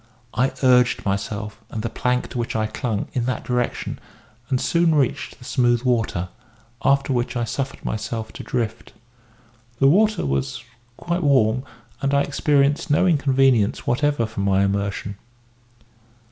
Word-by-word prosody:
I 125 +4 +1
urged 125 -1 +4
myself, 105 +2 -3
and 110 - -5
the 115 - -1
plank 125 0 -1
to 125 - -5
which 120 0 -3
I 110 -1 +1
clung, 110 -1 -2
in 120 -2 -1
that 130 - -2
direction, 125 -1 -2 0.5
and 130 -2 +1
soon 170 +1 +2
reached 140 -5 0
the 125 - -14
smooth 120 -2 +2
water; 115 -8 0 0.5
after 140 0 +2
which 120 +1 -1
I 120 - 0
suffered 135 +3 -4
myself 110 0 -4
to - - -8
drift. 115 -2 -3 0.8
The 135 - +2
water 210 +6 +3
was 70 - -2 0.3
quite 175 +1 -2
warm, 130 -4 +3 0.4
and 140 0 +1
I 140 - +4
experienced 145 +3 +1
no 150 +5 +3
inconvenience 135 - +3
whatever 145 -1 +1
from 110 -2 -5
my 100 0 +3
immersion. 100 0 -2
125 Hz, 145 wpm, -22 LUFS, 110-140 Hz, 0.8 s, urged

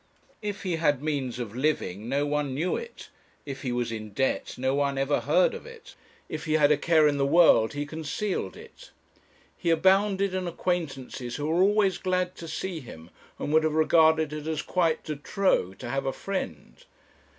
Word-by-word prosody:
If 205 -2 -4
he 180 -4 -1
had 145 -4 +1
means 140 -6 -2
of 120 -3 -6
living 120 -7 -1
no 140 +2 +1
one 145 -2 -1
knew 170 +6 0
it; 470 0 -8 0.4
if 135 -2 -6
he 130 - -2
was 120 -1 -1
in 110 -2 -6
debt 135 +5 -1
no 130 +1 0
one 140 -1 0
ever 135 +2 +1
heard - - +3
of 470 - -8
it; 470 -1 -13 0.3
if - - -6
he 155 - 0
had 150 -1 +4
a - - +6
care 155 +1 +4
in 145 -1 +1
the 140 - +1
world 150 -7 +5
he 145 0 -3
concealed 160 - -3
it. - - -14 0.7
He 170 - -2
abounded 190 +3 +3
in 185 -1 -2
acquaintances 140 -8 -3
who 145 - -3
were 165 +3 +2
always 200 -1 +3
glad 185 -1 0
to 165 - -8
see 165 +2 -4
him, 85 - -12 0.3
and 145 - -3
would 155 0 +5
have 155 -1 0
regarded 160 -1 +4
it 155 0 -6
as 160 -1 -2
quite 165 -3 0
de 150 -2 -4
trop 140 - 0
to - - -7
have 135 0 -1
a 135 - 0
friend. 195 - -5
155 Hz, 195 wpm, -27 LUFS, 135-180 Hz, 0.7 s, a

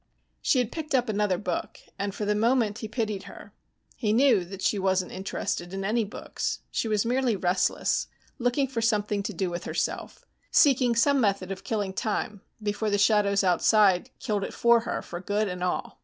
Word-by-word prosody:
She - - +2
had 245 -2 +1
picked 315 -3 -3
up 245 -3 +1
another 205 -3 +1
book, 180 -3 -4 0.2
and 200 0 -2
for 210 - -3
the 210 - +2
moment 225 0 +1
he 220 - -5
pitied 215 -4 -3
her. - - -12 0.4
He 215 -4 0
knew 240 -5 +4
that 190 +1 -8
she 205 - +1
wasn't 190 -1 0
interested 190 -1 -4
in 195 0 -3
any 225 +3 +1
books. 200 - -4
She - - -1
was 215 0 +1
merely 245 -1 +1
restless, 185 0 0 0.3
looking 245 +3 +1
for 245 -3 -3
something 210 -2 +1
to 200 - -4
do 185 -1 -2
with 175 0 -5
herself, - - -3 0.2
seeking 255 -5 +4
some 275 +4 +3
method 195 -3 0
of 190 - -6
killing 205 -4 -2
time 210 0 -2 0.2
before 210 +1 -1
the 205 - +2
shadows 200 -1 +3
outside 190 +1 +3
killed 210 -5 -2
it - - -5
for 235 0 +5
her 230 - -4
for 175 0 -7
good 205 +3 0
and 180 -1 -4
all. 180 - -3
210 Hz, 190 wpm, -27 LUFS, 195-235 Hz, 0.4 s, for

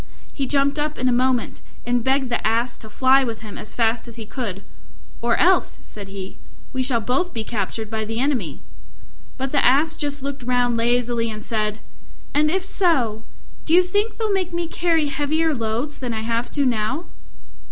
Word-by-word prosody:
He 275 -2 -2
jumped 280 +2 +2
up 300 +1 -1
in 255 - 0
a - - +4
moment, 250 0 +1 0.2
and 245 -1 +1
begged 265 0 +1
the 240 - 0
Ass 230 +2 +1
to 220 - -11
fly 260 +4 +4
with 230 -3 -4
him 215 -2 -8
as - - -6
fast 230 0 +1
as 235 - -9
he 225 -2 -7
could, 210 -5 -5 0.6
"Or 235 0 +2
else," 370 +1 +3
said 205 -2 -8
he, 195 -1 -7 0.4
"we 260 - 0
shall 255 -2 +2
both 260 - -1
be 225 - -1
captured 220 0 -3
by 220 -1 -1
the 225 +2 -3
enemy." 245 - -1 0.8
But 265 0 -2
the 285 - +3
Ass 300 +5 +4
just 285 -2 -3
looked 280 0 -4
round 245 -1 +2
lazily 235 0 +1
and 215 -1 -6
said, 215 -1 -1 0.5
"And 300 +1 +3
if 375 +3 0
so, 270 - +2 0.4
do 325 - +3
you 365 - +7
think 410 +5 0
they'll 435 -3 0
make 370 -2 0
me 340 0 -2
carry 330 -2 +1
heavier 300 +3 +1
loads 235 +4 -2
than 245 -3 -3
I 220 - -2
have 230 +2 -1
to 285 -2 +2
now?" 250 +7 0
250 Hz, 195 wpm, -22 LUFS, 225-295 Hz, 0.8 s, you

